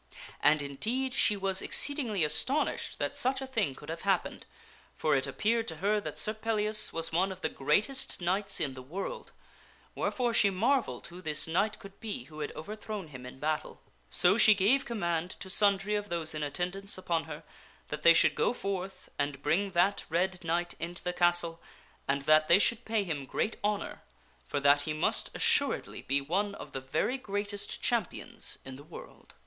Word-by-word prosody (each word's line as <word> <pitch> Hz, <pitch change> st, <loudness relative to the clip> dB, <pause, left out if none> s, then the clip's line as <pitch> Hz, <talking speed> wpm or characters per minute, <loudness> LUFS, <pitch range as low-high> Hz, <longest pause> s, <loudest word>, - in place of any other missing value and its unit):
And 150 Hz, 0 st, +4 dB
indeed 230 Hz, -, -1 dB
she 210 Hz, -5 st, +3 dB
was 195 Hz, -1 st, +1 dB
exceedingly 245 Hz, -, +1 dB
astonished 235 Hz, -, 0 dB
that -, -, -2 dB
such 260 Hz, +1 st, +1 dB
a 265 Hz, -, -4 dB
thing 220 Hz, -, -1 dB
could 145 Hz, -, -11 dB
have 165 Hz, +1 st, -4 dB
happened; 195 Hz, -2 st, 0 dB, 0.5 s
for 155 Hz, -2 st, +2 dB
it 135 Hz, -, +1 dB
appeared 230 Hz, +1 st, 0 dB
to 160 Hz, -, -4 dB
her 205 Hz, +5 st, +1 dB
that -, -, -5 dB
Sir 215 Hz, -, 0 dB
Pellias 215 Hz, -1 st, 0 dB
was 165 Hz, 0 st, -2 dB
one 185 Hz, +4 st, +2 dB
of 185 Hz, 0 st, -8 dB
the -, -, 0 dB
greatest 215 Hz, -, +1 dB
knights 195 Hz, +3 st, 0 dB
in 140 Hz, -4 st, -1 dB
the 130 Hz, -, -8 dB
world; 195 Hz, -, -6 dB, 0.6 s
where -, -, 0 dB
fore 245 Hz, -2 st, 0 dB
she 210 Hz, -2 st, +4 dB
marvelled 220 Hz, -, +1 dB
who 175 Hz, +1 st, -10 dB
this 155 Hz, -3 st, -2 dB
knight 200 Hz, +6 st, +1 dB
could 195 Hz, 0 st, -13 dB
be 220 Hz, -2 st, -4 dB
who 155 Hz, -1 st, -12 dB
had 150 Hz, -, -3 dB
overthrown 210 Hz, 0 st, -6 dB
him 130 Hz, -3 st, -9 dB
in 125 Hz, -, -10 dB
battle. 155 Hz, +2 st, -2 dB, 0.3 s
So 185 Hz, +5 st, +3 dB
she 215 Hz, -2 st, +7 dB
gave 220 Hz, +8 st, +3 dB
command 175 Hz, -6 st, -2 dB
to 190 Hz, -, -3 dB
sundry 200 Hz, 0 st, +3 dB
of 205 Hz, 0 st, -1 dB
those 165 Hz, -2 st, 0 dB
in 155 Hz, -, -4 dB
attendance 180 Hz, +7 st, -2 dB
upon 170 Hz, -3 st, -1 dB
her 155 Hz, 0 st, -8 dB, 0.5 s
that 150 Hz, -, -4 dB
they 170 Hz, -, +8 dB
should -, -, +5 dB
go -, -, +1 dB
forth 195 Hz, -4 st, -4 dB
and 140 Hz, -1 st, -2 dB
bring 200 Hz, +4 st, +2 dB
that 185 Hz, +3 st, +3 dB
red 180 Hz, +2 st, 0 dB
knight 170 Hz, +1 st, 0 dB
into 175 Hz, +1 st, -4 dB
the 180 Hz, -, -1 dB
castle 175 Hz, -1 st, +2 dB, 0.5 s
and 140 Hz, 0 st, 0 dB
that 155 Hz, +2 st, +5 dB
they 170 Hz, -, +7 dB
should 235 Hz, +3 st, +2 dB
pay 220 Hz, -2 st, +1 dB
him 150 Hz, -7 st, -4 dB
great 215 Hz, -, -1 dB
honor; 210 Hz, 0 st, -1 dB, 0.5 s
for 145 Hz, -, -1 dB
that 145 Hz, +1 st, +6 dB
he 155 Hz, +1 st, -2 dB
must 155 Hz, -, 0 dB
assuredly -, -, +1 dB
be 140 Hz, +1 st, +1 dB
one 200 Hz, +8 st, -1 dB
of -, -, -9 dB
the 135 Hz, -, -5 dB
very 155 Hz, -, -1 dB
greatest 205 Hz, -2 st, -4 dB
champions 235 Hz, -6 st, -1 dB
in 130 Hz, 0 st, -8 dB
the 140 Hz, -, -12 dB
world. 155 Hz, -, -13 dB
185 Hz, 190 wpm, -31 LUFS, 155-210 Hz, 0.6 s, they